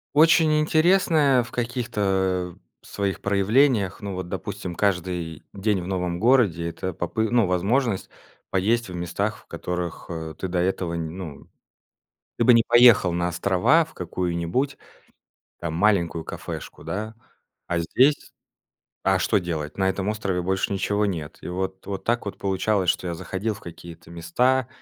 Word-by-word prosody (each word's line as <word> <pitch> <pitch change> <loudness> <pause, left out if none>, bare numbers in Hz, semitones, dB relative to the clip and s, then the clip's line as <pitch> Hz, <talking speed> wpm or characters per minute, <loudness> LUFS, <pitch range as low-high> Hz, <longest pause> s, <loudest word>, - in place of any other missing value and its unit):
Очень 155 0 +5
интересное 155 -4 +4
в 115 - -7
каких-то, 95 -7 -1
э, - - -29
своих 100 -1 -2
проявлениях. 100 +1 +2
Ну 100 -1 -4
вот, 90 -1 -5
допустим, 95 -1 -5
каждый 90 -4 -1
день 100 -1 0
в 90 - -7
новом 90 -2 -2
городе- 105 -8 +3
это 95 +2 -5
попы 110 +7 -1
ну, 120 -4 +3
возможность 100 +4 0 0.4
поесть 110 +4 +1
в - - -7
местах, 85 -1 -2
в - - -21
которых, 90 -2 -4
э, 80 -2 -5
ты 95 - -3
до 90 0 -1
этого 90 -1 -1
не, 85 -1 -3
ну 80 -4 -8 0.9
Ты - - +2
бы 125 - +7
не 115 -1 +5
поехал 120 -6 +6
на 85 0 0
острова 105 - +3
в 160 - -18
какую-нибудь, 90 - -2 0.8
там, 85 -2 -4
маленькую 85 -3 +2
кафешку, - - -7
да, 110 +3 -4 0.5
а 85 - 0
здесь 130 - +2 0.7
А 95 -1 +3
что 105 - +1
делать? 80 -5 -4
На 95 -1 +2
этом 95 +1 -3
острове 100 -4 -1
больше 95 +2 -1
ничего 100 +1 0
нет. 80 -6 -4
И - - -6
вот-вот 95 +2 -4
так 120 +1 0
вот 100 - -6
получалось, 95 0 0
что 90 - +1
я 85 - -2
заходил 95 +6 -3
в 105 - -13
какие-то 85 -1 -11
места, 120 +10 +1
95 Hz, 155 wpm, -24 LUFS, 85-115 Hz, 0.9 s, бы